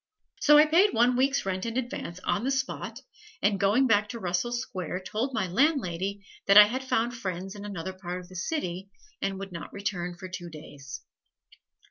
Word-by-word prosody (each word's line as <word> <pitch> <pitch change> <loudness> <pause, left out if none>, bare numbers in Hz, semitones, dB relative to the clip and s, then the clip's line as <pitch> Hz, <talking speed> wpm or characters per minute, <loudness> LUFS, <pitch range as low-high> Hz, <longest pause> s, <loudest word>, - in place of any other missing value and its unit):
So 295 0 +7
I 300 - +8
paid 360 +6 +4
one 240 +2 +4
week's 270 0 +2
rent 190 -1 -2
in 230 +1 -3
advance 235 -8 -4
on 205 +2 0
the 265 - 0
spot, 265 -1 -3 0.4
and 200 -1 +2
going 205 +7 +4
back 210 -3 +3
to 235 - -6
Russell 180 +5 -1
Square 190 -7 -4
told 225 +8 -2
my 225 - 0
landlady 200 - 0 0.2
that 200 +1 +7
I 210 - +12
had 255 +5 -3
found 240 -2 0
friends 190 -3 -4
in 205 -1 -8
another 190 -2 -5
part 180 -1 -5
of 180 - -12
the 185 - -14
city 190 - -3 0.3
and 195 0 -1
would 195 0 -7
not 170 -1 -7
return 180 -3 -3
for 185 - -7
two 180 -1 -7
days. 145 -3 -10
200 Hz, 190 wpm, -28 LUFS, 185-245 Hz, 0.4 s, I